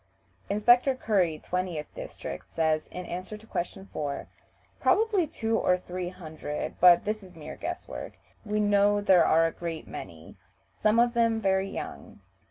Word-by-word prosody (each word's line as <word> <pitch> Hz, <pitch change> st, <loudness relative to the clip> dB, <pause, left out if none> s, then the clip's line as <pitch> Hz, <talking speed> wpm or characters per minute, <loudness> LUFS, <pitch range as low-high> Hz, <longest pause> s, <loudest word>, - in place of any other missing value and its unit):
Inspector 240 Hz, +6 st, +4 dB
Curry, 185 Hz, -10 st, +1 dB
20th 180 Hz, -4 st, -2 dB
district, -, -, -7 dB
says, 160 Hz, -1 st, +1 dB
in 180 Hz, 0 st, -7 dB
answer 185 Hz, +5 st, -6 dB
to 215 Hz, -, -17 dB
question 190 Hz, -1 st, -4 dB
4: 145 Hz, -2 st, -3 dB, 0.5 s
"Probably 420 Hz, -6 st, +3 dB
two 225 Hz, -4 st, -1 dB
or 180 Hz, -, +3 dB
three 180 Hz, 0 st, -5 dB
hundred, 160 Hz, -4 st, -6 dB
but 175 Hz, -1 st, +7 dB
this 215 Hz, +1 st, -2 dB
is 185 Hz, -3 st, -14 dB
mere 155 Hz, -2 st, -8 dB
guess -, -, -5 dB
work. -, -, -7 dB, 0.3 s
We 210 Hz, -1 st, -1 dB
know 205 Hz, 0 st, +4 dB
there 190 Hz, -4 st, +5 dB
are 165 Hz, +1 st, +5 dB
a 165 Hz, -, +1 dB
great 165 Hz, -2 st, -5 dB
many; 80 Hz, -1 st, -9 dB, 0.4 s
some 215 Hz, +1 st, +2 dB
of 240 Hz, 0 st, +4 dB
them 230 Hz, -2 st, +2 dB
very 195 Hz, -1 st, +1 dB
young." -, -, -7 dB
190 Hz, 160 wpm, -28 LUFS, 170-215 Hz, 0.5 s, but